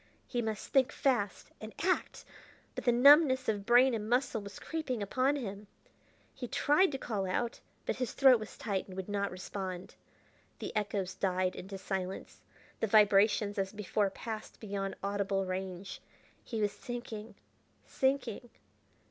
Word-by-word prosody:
He 245 - -2
must 220 -3 -4
think 265 -2 +3
fast 240 -7 0
and 220 0 -8
act! 370 +1 0 0.5
but - - -6
the 245 - +5
numbness 260 +2 +6
of 205 -2 -1
brain 245 +2 +6
and 215 -1 -3
muscle 245 -2 +1
was 200 -1 -9
creeping 270 -9 -3
upon 260 +7 +1
him. 205 -6 -5 0.7
He 245 - -6
tried 295 +9 +3
to - - -1
call 205 -7 -2
out, 230 +6 -1 0.3
but - - -1
his 250 -2 -2
throat 265 -3 +6
was 215 - -9
tight, 200 -4 -2
and 185 - -10
would 190 - -4
not 200 -1 -1
respond. 185 0 -6 0.6
The - - -6
echoes 200 -3 -1
died 185 -1 0
into 195 +1 -7
silence; 190 -1 -5 0.4
the 225 - +1
vibrations, 205 0 +4
as 190 0 -1
before, 210 -1 0
passed 220 +2 -7
beyond 195 -2 -3
audible 200 -1 0
range. 185 0 -5 0.4
He 225 -3 -4
was 205 -1 +2
sinking... 230 -3 -7 0.5
sinking.... 265 -3 -1
210 Hz, 150 wpm, -32 LUFS, 195-245 Hz, 0.7 s, numbness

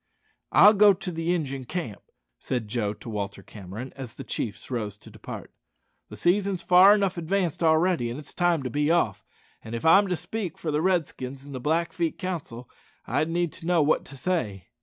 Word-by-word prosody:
"I'll 210 - +8
go 205 -1 +6
to 180 0 -6
the 165 +1 -2
Injun 135 -7 -2
camp," 120 - -5 0.4
said 120 -4 -3
Joe 105 -1 -1
to 105 - -14
Walter 100 -2 -4
Cameron, 105 +7 -9
as 130 -4 -8
the 135 - -7
chiefs 115 -1 -5
rose 110 -5 -3
to - - -15
depart. - - -9 0.6
"The - - -9
season's 190 0 +1
far 185 +3 +7
enough 195 -4 0
advanced 175 0 -1
already; 160 -5 +3
it's 140 +5 -8
time 175 -5 +1
to 125 - -4
be 145 +3 +1
off; 105 - +1 0.4
and 110 +1 -6
if 115 - -5
I'm 195 +5 +6
to 180 -2 -1
speak 180 +2 -5
for 160 - -3
the 150 +1 +1
Redskins 140 -7 -1
in 145 - -10
the 130 - -5
Blackfeet 165 +3 -1
Council, 155 -10 -5 0.4
I'd 145 +7 0
need 170 -1 -1
to 165 - -9
know 175 -3 +4
what 150 - +2
to 135 - -12
say." 120 - -2
155 Hz, 190 wpm, -26 LUFS, 120-180 Hz, 0.6 s, I'll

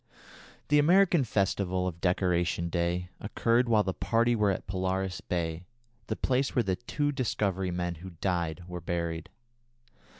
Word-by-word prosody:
The 150 0 +5
American 175 0 +5
festival 95 -4 0
of 85 -2 -4
"Decoration 90 -2 +1
Day" 85 +1 -1
occurred 115 +3 +1
while 110 -2 +4
the 95 -1 -2
party 115 +4 +2
were 105 -2 +2
at 95 - -2
Polaris 95 0 -2
Bay, 85 0 -3 0.4
the 110 - -1
place 130 +3 0
where 120 - +3
the 95 -3 0
two 145 +7 -1
Discovery 95 -7 -1
men 90 0 -2
who 95 -1 -9
died 85 -2 -1
were 90 -1 -6
buried. 85 -1 -3
95 Hz, 145 wpm, -29 LUFS, 90-115 Hz, 0.4 s, The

